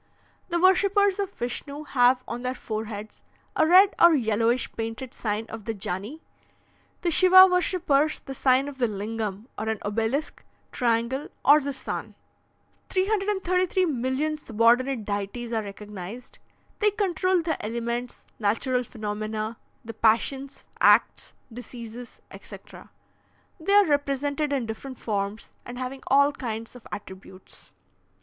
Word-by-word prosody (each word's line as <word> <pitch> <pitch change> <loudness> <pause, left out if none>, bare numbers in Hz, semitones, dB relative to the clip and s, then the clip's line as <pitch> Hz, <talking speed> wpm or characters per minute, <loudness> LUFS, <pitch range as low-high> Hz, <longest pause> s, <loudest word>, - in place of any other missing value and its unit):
"The 345 0 0
worshippers 395 +2 +3
of 395 -2 -1
Vishnu 280 -1 -5
have 250 -2 +3
on 235 +1 -5
their 255 +1 -2
foreheads 215 -2 -6 0.3
a 315 - +3
red 380 +4 +7
or 340 -1 +8
yellowish 230 0 +1
painted 225 +3 -5
sign 215 0 -3
of 225 -2 -9
the 225 - -3
Jani; 200 - -5 0.8
the 345 - 0
Shiva 370 +3 +8
worshippers, 355 -5 +1
the 270 - -7
sign 265 +1 +2
of 280 -2 -8
the 245 - +2
Lingam, 210 0 -4
or 220 +1 -2
an 220 - -1
obelisk, 225 +8 -2 0.3
triangle, 240 +3 0 0.2
or 290 +2 +8
the 280 +1 -3
sun. 265 -1 -5 0.7
"333,000,000 365 - 0
subordinate 235 0 +2
deities 205 +4 -4
are 225 - +1
recognised. 205 +2 -9 0.4
They 420 - +4
control 370 -3 0
the 320 -1 -2
elements, 235 +2 -4
natural 240 +4 +1
phenomena, 215 0 -4 0.3
the 230 - -7
passions, 250 +5 0
acts, - - +3 0.2
diseases, 240 0 -10
etc. - - -12 0.7
They 345 +5 0
are 410 0 +7
represented 285 0 0
in 270 -4 0
different 245 +4 -7
forms 205 0 -3
and 245 0 -8
having 255 +1 -5
all 280 +1 +5
kinds 230 -4 -6
of 245 - -13
attributes. 190 -2 -10
250 Hz, 130 wpm, -25 LUFS, 220-305 Hz, 0.8 s, or